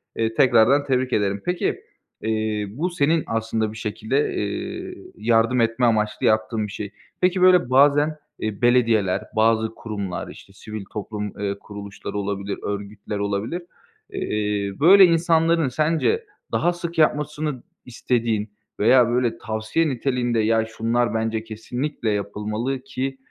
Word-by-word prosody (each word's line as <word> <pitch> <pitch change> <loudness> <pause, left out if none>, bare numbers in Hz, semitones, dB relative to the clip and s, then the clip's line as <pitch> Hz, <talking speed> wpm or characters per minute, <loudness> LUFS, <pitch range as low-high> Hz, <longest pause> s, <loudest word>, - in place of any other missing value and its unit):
Eee, 115 0 0
tekrardan 125 +3 +4
tebrik 130 -1 0
ederim. 100 -1 0
Peki, 180 0 -1 0.4
eee, 110 -1 -1
bu 150 - -2
senin 165 -2 +1
aslında 110 -1 -1
bir 110 - -10
şekilde, 110 +6 -1
eee, 100 -1 -4 0.2
yardım 115 +2 +2
etme 115 +2 +1
amaçlı 110 -2 +1
yaptığın 110 0 +1
bir - - -10
şey. 100 0 -6 0.3
Peki, 180 0 +2
böyle, 180 -7 +5
bazen, 145 +3 +4 0.2
eee, 110 0 -4
belediyeler, 115 -6 +3
bazı 110 0 +2
kurumlar, 100 -5 -5
işte, 95 - -13
sivil 105 +1 -8
toplum, 105 -1 -5
eee, 100 -1 -1
kuruluşları 100 0 -8
olabilir, 100 0 -3
örgütler 100 +1 -5
olabilir. 100 - -2 0.5
Eee, 105 -1 -2
böyle 190 +6 +8
insanların 165 -2 +3
sence 160 - +1 0.3
daha 175 - +1
sık 170 -1 -6
yapmasını 150 -3 0 0.2
istediğin 115 -3 -1 0.3
veya 120 +2 +5
böyle 120 -1 0
tavsiye 110 +9 -1
niteliğinde, 125 -2 0
"Ya, 110 +1 +2
şunlar 115 +2 0
bence 110 0 -1
kesinlikle 115 +3 -4
yapılmalı 105 +5 -2
ki 135 0 -4
115 Hz, 130 wpm, -23 LUFS, 105-135 Hz, 0.5 s, böyle